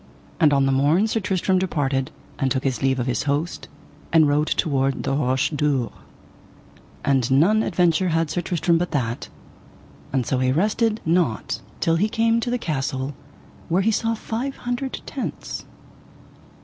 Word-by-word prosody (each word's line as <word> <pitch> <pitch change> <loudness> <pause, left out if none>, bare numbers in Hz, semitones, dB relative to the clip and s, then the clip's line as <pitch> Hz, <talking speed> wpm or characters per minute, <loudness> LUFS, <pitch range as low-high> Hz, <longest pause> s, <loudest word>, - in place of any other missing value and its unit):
And 155 -4 +5
on 140 -1 +3
the 135 - +2
morn 145 +9 +3
Sir 225 0 0
Tristram 190 -1 +1
departed, 140 -7 -1 0.3
and 135 - +1
took 130 +1 -1
his 130 -4 -1
leave 130 -1 +1
of 120 - -1
his 125 -1 0
host, 145 +4 -2 0.4
and 160 -2 +5
rode 150 +2 +2
toward 135 -3 0
the 135 - -1
Roche 130 0 +1
Dure, 145 -5 0 1.1
and 135 -3 +2
none 170 +12 +4
adventure 180 -2 +2
had 165 -2 0
Sir 175 - -1
Tristram 170 -1 +1
but 175 0 -1
that; 120 -5 -2 0.8
and 130 -3 0
so 130 - 0
he 130 0 +2
rested 215 - +1
not 165 -8 0 0.2
till 165 0 +2
he 210 +5 +1
came 230 0 +2
to 235 - -2
the 245 - +1
castle, 135 - -2 0.6
where 185 +4 +2
he 225 - +3
saw 225 +1 0
five 240 +5 -4
hundred 245 +2 -2
tents. - - -5
155 Hz, 160 wpm, -23 LUFS, 135-190 Hz, 1.1 s, And